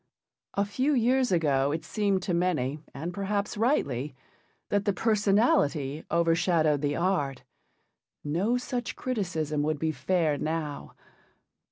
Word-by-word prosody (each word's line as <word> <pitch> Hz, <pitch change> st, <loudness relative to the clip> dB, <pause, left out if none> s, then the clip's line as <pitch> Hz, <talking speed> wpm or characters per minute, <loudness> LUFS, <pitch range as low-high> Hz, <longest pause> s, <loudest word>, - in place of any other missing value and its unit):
A 200 Hz, -, +2 dB
few 260 Hz, +8 st, 0 dB
years 255 Hz, +1 st, +2 dB
ago 145 Hz, -5 st, +2 dB
it 160 Hz, +2 st, -3 dB
seemed 200 Hz, -3 st, 0 dB
to 180 Hz, -, -1 dB
many, 155 Hz, -6 st, 0 dB
and 160 Hz, +7 st, -5 dB
perhaps 200 Hz, +1 st, -2 dB
rightly, 150 Hz, -, 0 dB, 0.5 s
that 205 Hz, 0 st, +1 dB
the 205 Hz, -, +2 dB
personality 200 Hz, -, +2 dB
overshadowed 165 Hz, -3 st, +2 dB
the 145 Hz, 0 st, 0 dB
art. 145 Hz, -8 st, 0 dB, 0.8 s
No 185 Hz, +11 st, +1 dB
such 245 Hz, -1 st, -4 dB
criticism 175 Hz, -, -2 dB
would 155 Hz, +1 st, 0 dB
be 160 Hz, +2 st, 0 dB
fair 160 Hz, -3 st, 0 dB
now. 155 Hz, -2 st, -4 dB
175 Hz, 125 wpm, -28 LUFS, 150-205 Hz, 0.8 s, A